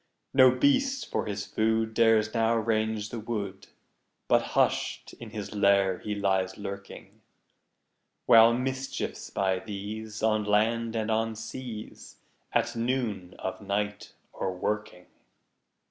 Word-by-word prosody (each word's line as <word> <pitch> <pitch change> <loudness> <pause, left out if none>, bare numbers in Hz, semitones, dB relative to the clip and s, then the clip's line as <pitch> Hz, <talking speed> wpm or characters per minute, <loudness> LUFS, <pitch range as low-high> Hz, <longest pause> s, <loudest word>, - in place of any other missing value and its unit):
No 130 -1 +8
beast, 270 - +1
for - - -1
his 100 -1 -3
food, 110 0 0
Dares 115 -1 +3
now 115 0 +2
range 110 -1 0
the 115 - -5
wood, 105 -4 -5 0.6
But - - +4 0.2
hush'd - - +1
in 120 - -8
his 105 -2 -6
lair 100 -2 +3
he 105 -1 -4
lies 95 -2 0
lurking; 100 -1 -8 1.0
While 115 -1 +8
mischiefs, 130 +1 -3
by 95 -1 0
these, 105 +2 -6
On 110 -1 +2
land 115 +3 +1
and 110 0 -1
on 110 0 0
seas, 115 0 -8 0.4
At - - 0
noon 115 -6 -2
of 95 - -5
night 105 +1 -3 0.2
are - - -3
a - - 0
working. 90 -1 -3
110 Hz, 130 wpm, -28 LUFS, 100-115 Hz, 1.0 s, No